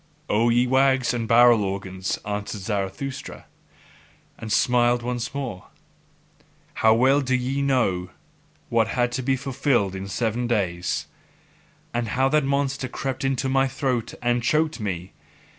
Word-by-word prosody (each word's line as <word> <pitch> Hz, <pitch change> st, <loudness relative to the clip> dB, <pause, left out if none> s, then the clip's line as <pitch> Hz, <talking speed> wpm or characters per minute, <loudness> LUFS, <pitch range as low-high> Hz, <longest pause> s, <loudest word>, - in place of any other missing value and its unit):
O 115 Hz, +3 st, +3 dB
ye 120 Hz, +1 st, +3 dB
wags 130 Hz, 0 st, +3 dB
and 115 Hz, -2 st, -2 dB
barrel 120 Hz, -1 st, +6 dB
organs! 95 Hz, -1 st, -3 dB
answered 105 Hz, 0 st, -4 dB
Zarathustra, 105 Hz, +7 st, -4 dB, 0.9 s
and 110 Hz, -1 st, -8 dB
smiled 120 Hz, 0 st, +3 dB
once 120 Hz, 0 st, -3 dB
more, 130 Hz, -9 st, -5 dB, 1.1 s
how 110 Hz, 0 st, +6 dB
well 135 Hz, +4 st, +4 dB
do 130 Hz, -1 st, 0 dB
ye 130 Hz, +2 st, -1 dB
know 115 Hz, -10 st, +1 dB, 0.6 s
what 115 Hz, -2 st, +2 dB
had 120 Hz, +1 st, 0 dB
to 125 Hz, +2 st, -2 dB
be 135 Hz, +1 st, +1 dB
fulfilled 125 Hz, -6 st, 0 dB
in 95 Hz, 0 st, -6 dB
seven 115 Hz, +3 st, -1 dB
days: 90 Hz, -7 st, -1 dB, 0.9 s
And 120 Hz, -1 st, -1 dB
how 130 Hz, +5 st, +1 dB
that 150 Hz, +1 st, +2 dB
monster 135 Hz, -1 st, -1 dB
crept 130 Hz, +1 st, -4 dB
into 135 Hz, 0 st, 0 dB
my 135 Hz, 0 st, +2 dB
throat 130 Hz, -3 st, -2 dB
and 120 Hz, 0 st, +1 dB
choked 155 Hz, +4 st, +1 dB
me! 95 Hz, -3 st, -4 dB
120 Hz, 140 wpm, -24 LUFS, 105-135 Hz, 1.1 s, barrel